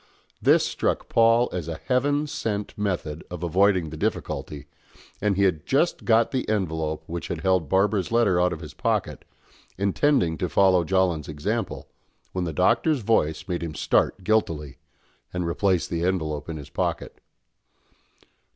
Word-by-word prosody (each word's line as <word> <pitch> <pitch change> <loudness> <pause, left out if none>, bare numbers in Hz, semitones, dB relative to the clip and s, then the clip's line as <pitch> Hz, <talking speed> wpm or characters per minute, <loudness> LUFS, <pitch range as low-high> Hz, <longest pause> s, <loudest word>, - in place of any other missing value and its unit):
This - - +4
struck - - -2
Paul 115 +1 +4
as 90 -3 -4
a 80 -1 -4
heaven 145 +3 +1
sent 105 -9 -3
method 85 -7 -3
of 90 -1 -7
avoiding 90 -1 +2
the 80 - -7
difficulty, 75 -1 -3 0.6
and 105 -1 +1
he 100 - +3
had 90 -6 +1
just 145 +6 0
got 115 0 +3
the 130 -4 -2
envelope 80 -7 -1
which 85 +1 -5
had 85 -2 -4
held 95 -4 +1
Barbara's 95 +2 +1
letter 105 -7 +3
out 90 0 +2
of 85 -2 -5
his 75 - -9
pocket, - - -1 0.5
intending 100 - +1
to 90 - -1
follow 95 +2 +4
Jolland's 90 -3 0
example, 75 -1 -3 0.4
when 90 -1 -2
the 80 - -3
Doctor's 115 - +2
voice 80 -8 +1
made 90 -2 -2
him 80 -3 -5
start 95 - +1
guiltily 85 -9 0 0.5
and 90 -1 -2
replace 90 +1 +1
the 85 0 -2
envelope 80 -5 -1
in 80 - -4
his 75 -1 -10
pocket. - - -3
90 Hz, 155 wpm, -25 LUFS, 80-105 Hz, 0.6 s, This